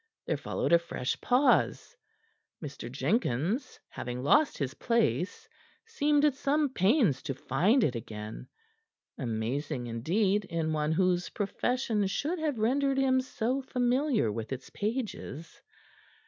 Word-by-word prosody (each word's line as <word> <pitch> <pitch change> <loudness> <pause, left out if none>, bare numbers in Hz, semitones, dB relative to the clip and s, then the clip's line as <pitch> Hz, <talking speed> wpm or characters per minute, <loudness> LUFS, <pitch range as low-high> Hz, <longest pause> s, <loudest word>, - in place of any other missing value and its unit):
There - - 0
followed - - -1
a 170 - +7
fresh 150 -6 -3
pause. 270 - +2 0.6
Mr. 140 -5 -7
Jenkins, 165 - -1
having 125 0 -5
lost 295 - +4
his 135 -2 -2
place, 230 -6 0 0.4
seemed 300 -10 +2
at 295 - +4
some 285 +2 +1
pains 205 - +2
to 135 - -4
find 180 - +2
it 130 - +2
again 110 -2 -7 0.7
amazing, 125 +3 -2
indeed, 190 - +1
in 165 -3 -2
one 150 0 0
whose 180 0 +1
profession 215 0 -1
should 300 - -2
have 305 -5 -1
rendered 270 +5 +1
him 260 -1 +3
so 255 +1 -2
familiar 250 - +1
with 110 +3 -5
its 130 -1 -6
pages. 210 - -4
200 Hz, 125 wpm, -29 LUFS, -, 0.7 s, a